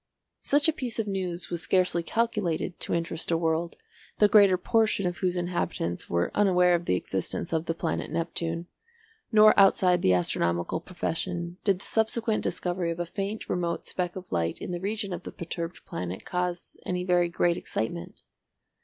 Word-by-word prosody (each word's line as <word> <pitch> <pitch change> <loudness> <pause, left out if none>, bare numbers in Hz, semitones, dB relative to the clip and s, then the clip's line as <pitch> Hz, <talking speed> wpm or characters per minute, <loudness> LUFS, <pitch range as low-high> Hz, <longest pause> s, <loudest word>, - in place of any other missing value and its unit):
Such 290 +2 +3
a 320 - +3
piece 250 -6 -3
of 225 - 0
news 185 -3 -3
was 170 -1 -1
scarcely 180 -2 +2
calculated 195 -4 -1
to - - -3
interest 165 -1 -2
a 165 - +3
world 165 +1 -1 0.4
the 210 - +6
greater 200 -3 +6
portion 220 -1 +2
of 175 -1 -1
whose 180 -1 0
inhabitants 175 - -2
were 85 0 0
unaware 180 -3 +4
of 170 0 0
the 90 - +2
existence 95 - -2
of 160 0 0
the 165 - -1
planet 165 -1 -2
Neptune, 165 0 -2 0.7
nor 215 -1 +8
outside 185 -2 +5
the 95 - +4
astronomical 85 - 0
profession 175 0 -3
did 195 -3 +3
the 190 - -13
subsequent 220 0 +1
discovery 175 -1 -1
of 165 0 -3
a 175 - -1
faint 200 +4 -4
remote 170 -2 -2
speck 180 -1 -2
of 185 -1 -9
light 85 -1 0
in - - -6
the 175 - -3
region 200 0 -2
of 175 - -5
the - - -8
perturbed 170 0 -6
planet 90 +1 -5
cause 180 -1 -3
any 180 0 -2
very 175 -1 +2
great 170 0 +2
excitement. 85 - -4
175 Hz, 175 wpm, -27 LUFS, 165-195 Hz, 0.7 s, nor